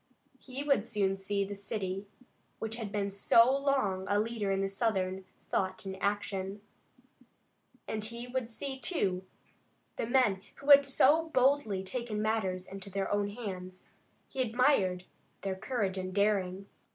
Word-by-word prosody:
He 265 +2 -6
would 275 -7 +2
soon 200 -4 +1
see 200 +1 -1
the 200 - -6
city 195 -1 -4 0.5
which 225 +1 -4
had 220 -4 -5
been 200 -1 -1
so 230 +6 +5
long 265 -10 0
a 205 +1 +2
leader 220 -2 -1
in 195 0 +1
Southern 190 -3 -1 0.3
thought 190 0 -1
and 190 0 -4
action, 200 -1 -2 1.3
and 215 -1 -3
he 235 +2 -5
would 250 -1 -3
see, 265 +3 -4
too, 190 - 0 0.7
the - - -2
men 240 -7 +3
who 280 +1 +1
had 280 0 +9
so 300 +4 +4
boldly 255 -8 +2
taken 230 +1 -3
matters 200 -4 0
in 195 - -7
their 195 0 -3
own 205 0 +1
hands. 185 -4 -7 0.4
He 265 - -3
admired 225 -7 +2 0.4
their 195 -1 -1
courage 195 -2 -2
and 185 0 -4
daring. 200 -2 +1
205 Hz, 145 wpm, -31 LUFS, 195-245 Hz, 1.3 s, had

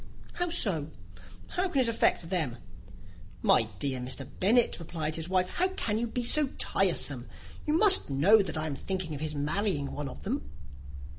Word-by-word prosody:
"How 355 0 -2
so? 175 - +1 0.6
how 370 +1 -1
can 280 - 0
it 250 - +2
affect 195 -6 +1
them?" 150 -10 -1 0.9
"My 110 - +4
dear 130 +3 -2
Mr. 130 +1 -5
Bennet," 230 +4 +3
replied 160 -2 -4
his 165 +1 -4
wife, 185 -1 +2
"how 365 - 0
can 225 - -2
you 235 - -1
be 245 +2 -3
so 295 +4 +4
tiresome? - - +2 0.4
You 305 +1 +2
must 390 - +4
know 175 +11 +5
that 190 - -4
I 155 - -1
am 150 -3 -3
thinking 185 +1 -4
of 145 - -6
his 155 -1 -3
marrying 150 0 -1
one 145 -2 -5
of - - -11
them." 70 - -4
180 Hz, 175 wpm, -28 LUFS, 145-235 Hz, 0.9 s, know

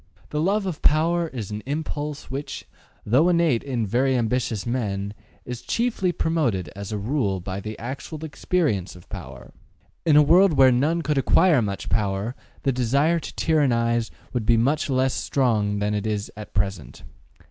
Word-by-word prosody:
The 150 - -1
love 200 +4 +1
of 180 -5 -4
power 165 +3 +3
is 115 -9 -6
an 105 0 -4
impulse 150 -1 -4
which, 140 +2 -5 0.4
though 135 +11 +4
innate 170 -9 +3
in 125 -5 -2
very 130 +5 +2
ambitious 115 -2 -1
men, 100 -5 -2 0.3
is 125 -1 -6
chiefly 230 -6 0
promoted 150 - -1
as 100 +1 -6
a 105 - -2
rule 105 -3 -1
by 95 +2 -5
the 110 +2 -6
actual 140 +6 -6
experience 145 - -1
of 90 - -15
power. 60 -2 -9 0.5
In 155 -3 +4
a 150 - +8
world 175 +4 +5
where 135 -2 +6
none 155 +7 +1
could 150 -1 +1
acquire 165 0 +4
much 100 -2 -3
power, 100 +3 -1 0.3
the 135 - +2
desire 140 +7 +2
to - - -9
tyrannize 120 -7 +1 0.2
would 120 -4 -2
be 120 -1 +5
much 140 +7 +1
less 130 0 +2
strong 110 -6 +1
than 105 +1 0
it 105 +1 -1
is 105 -1 -2
at 105 0 -10
present. 95 -4 -2
125 Hz, 170 wpm, -24 LUFS, 105-150 Hz, 0.5 s, a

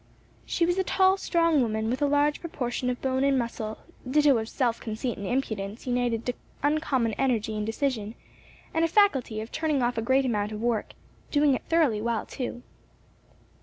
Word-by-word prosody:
She 340 - +1
was 350 +2 +1
a - - +3
tall, 375 +1 +4
strong 335 -6 +2
woman 220 -2 -1
with 255 - -2
a 290 - +3
large 290 +1 +2
proportion 250 -6 -3
of 250 - -2
bone 260 0 +1
and 275 -1 +3
muscle; 230 -3 -3 0.3
ditto 290 0 +5
of 220 0 -5
self 240 -4 0
conceit 225 +2 -3
and 200 - -4
impudence 220 -5 -3
united 245 -2 0
to 245 - 0 0.3
uncommon 285 -6 +1
energy 225 -5 +1
and 210 0 -2
decision, 225 -2 -2 0.6
and 325 - +2
a - - +4
faculty 280 - +2
of 220 - -8
turning 305 -5 0
off 240 -1 0
a - - -1
great 265 +4 +2
amount 210 -3 -1
of 210 - -5
work; 230 -1 -1 0.4
doing 290 -1 +3
it - - -1
thoroughly 300 -11 +3
well 230 0 -1
too. 245 -1 -5
250 Hz, 185 wpm, -27 LUFS, 225-290 Hz, 0.6 s, ditto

